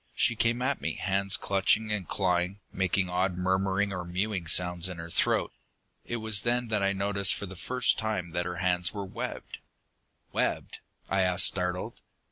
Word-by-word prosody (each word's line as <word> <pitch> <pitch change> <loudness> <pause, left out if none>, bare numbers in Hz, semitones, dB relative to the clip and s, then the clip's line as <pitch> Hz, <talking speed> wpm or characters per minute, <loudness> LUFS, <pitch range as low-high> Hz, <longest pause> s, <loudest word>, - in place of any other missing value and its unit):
"She 120 - +3
came 115 +2 +1
at 140 +1 -1
me, - - -2
hands 100 0 +2
clutching 100 +3 +1
and 105 -4 -2
clawing, 90 0 0
making 95 0 0
odd 90 0 -1
murmuring 95 +2 0
or 90 -2 -4
mewing 90 0 -3
sounds 90 +1 +3
in 90 - -6
her 85 0 -8
throat. - - +2 0.5
It 120 - -4
was 110 -3 +3
then 120 0 0
that 105 -2 +1
I 100 0 +2
noticed 100 -1 +1
for - - -5
the 95 0 -9
first 125 +7 0
time 105 -6 -3
that 85 +1 -2
her 90 - -4
hands 90 +1 +1
were 100 -1 -4
webbed!" 95 - -6 0.7
"Webbed?" - - -2 0.3
I 95 0 +1
asked, 90 0 +4
startled. 90 -1 0
95 Hz, 175 wpm, -28 LUFS, 90-105 Hz, 0.7 s, asked